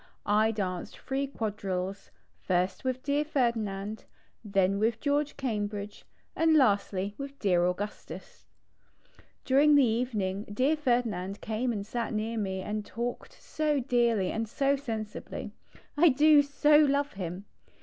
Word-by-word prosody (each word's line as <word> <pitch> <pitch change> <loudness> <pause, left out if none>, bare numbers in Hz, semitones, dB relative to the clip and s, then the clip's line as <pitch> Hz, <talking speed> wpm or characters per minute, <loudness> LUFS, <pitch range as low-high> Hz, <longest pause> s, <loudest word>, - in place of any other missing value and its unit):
I 215 +2 +3
danced 185 -5 -4
3 275 +1 -2
quadrilles; 200 -6 -4 0.4
ist 185 +4 +1
with 255 0 -2
dear 285 +1 +1
Ferdinand, 220 -7 -2 0.4
then 195 -2 +1
with 225 +1 +1
George 290 +1 0
Cambridge, 210 -5 -4 0.3
and 325 -1 +3
lastly 200 -5 +2
with 280 0 -7
dear 180 -6 +2
Augustus. 205 +4 -6 1.0
During 285 +3 +5
the 280 -2 +6
evening 220 -4 -1
dear 255 +9 +1
Ferdinand 230 -9 -1
came 225 +3 -2
and 205 -3 -4
sat 235 +1 -3
near 220 +2 -2
me 190 -2 -2
and 210 +2 -3
talked 235 +3 -5
so 305 -2 -1
dearly 235 -6 +1
and 225 -1 -3
so 275 +4 +1
sensibly. 225 -6 -6 0.4
I 330 +3 +6
do 295 +2 +6
so 295 +1 +4
love 285 -1 +2
him. 185 0 -6
225 Hz, 130 wpm, -29 LUFS, 200-275 Hz, 1.0 s, the